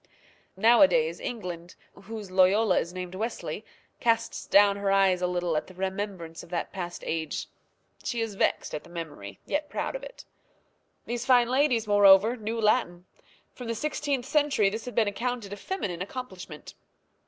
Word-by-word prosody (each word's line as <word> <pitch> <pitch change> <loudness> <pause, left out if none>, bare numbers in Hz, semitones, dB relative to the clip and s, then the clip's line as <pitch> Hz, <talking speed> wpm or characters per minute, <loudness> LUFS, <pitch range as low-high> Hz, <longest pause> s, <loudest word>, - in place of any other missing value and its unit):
Nowadays 285 - +5
England, 180 -7 -6 0.2
whose 210 -1 -9
Loyola 190 +2 +4
is 170 - -4
named 180 0 -6
Wesley, 220 +5 -4 0.4
casts 230 -1 0
down 200 0 +5
her 200 -1 0
eyes 195 -2 +3
a 180 - +2
little 175 -2 -1
at 155 - -1
the 185 - -14
remembrance 190 -3 -4
of - - -14
that 175 -1 -3
past 175 -2 -5
age. 160 -2 -2 0.6
She 240 - -2
is 225 -2 -2
vexed 195 - 0
at 150 - -4
the - - -16
memory, 160 - -7
yet 295 0 -2
proud - - -3
of - - -4
it. - - -11 0.8
These 240 +1 -4
fine 245 -2 +5
ladies, 255 -4 +2
moreover, 205 +2 +6
knew 225 0 -4
Latin. 210 -5 +1 0.5
From 245 - -8
the 230 - -1
16th 285 0 -2
century 270 -9 +2
this 220 +2 -5
had 245 - -7
been 225 -3 +3
accounted 230 -1 -3
a - - -4
feminine 200 - -4
accomplishment. 185 - -7
205 Hz, 165 wpm, -27 LUFS, 180-240 Hz, 0.8 s, moreover